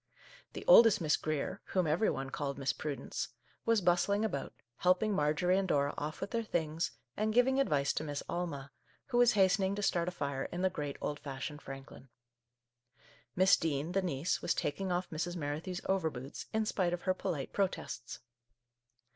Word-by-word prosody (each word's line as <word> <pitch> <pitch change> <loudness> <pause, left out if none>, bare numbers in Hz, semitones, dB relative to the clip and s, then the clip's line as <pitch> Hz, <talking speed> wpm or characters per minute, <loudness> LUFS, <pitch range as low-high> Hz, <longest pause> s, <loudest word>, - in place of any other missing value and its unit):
The - - -7
oldest 230 - +8
Miss 155 -3 +3
Grier 155 -2 -3
— - - -49
whom 185 -2 +3
every 160 +8 +2
one 135 0 -3
called 140 -1 -3
Miss 135 -1 0
Prudence 145 -3 -4 0.2
— - - -35
was 230 -2 +4
bustling 195 +4 +2
about, 140 -11 -3 0.3
helping 185 +4 +3
Marjorie 175 +4 +2
and 195 - -1
Dora 145 -4 +1
off 155 +1 -5
with 195 - -4
their 230 - 0
things, 165 -5 -1 0.2
and 215 +1 0
giving 265 +2 +4
advice 145 - +2
to - - -2
Miss 145 -2 -4
Alma, 145 -6 -4 0.4
who 240 - +2
was 245 -1 +6
hastening 195 -1 +3
to 205 - -3
start 170 -3 +1
a - - 0
fire 140 -5 -3
in 175 +1 -4
the 190 - +3
great 145 -5 -4
old 145 - -2
fashioned 145 +2 -6
Franklin. 135 -1 -10 1.3
Miss 185 +2 +6
Dean, 155 0 -1
the 195 +2 +1
niece, 170 -2 -1
was - - 0
taking 190 +6 -2
off 180 +1 0
Mrs. 175 +3 -3
Merrithew's 160 +4 -3
overboots, 160 -8 -2
in 220 0 +1
spite 180 -4 0
of 175 - -4
her 185 - +2
polite 150 -6 -4
protests. 185 -10 -2
175 Hz, 180 wpm, -33 LUFS, 145-190 Hz, 1.3 s, oldest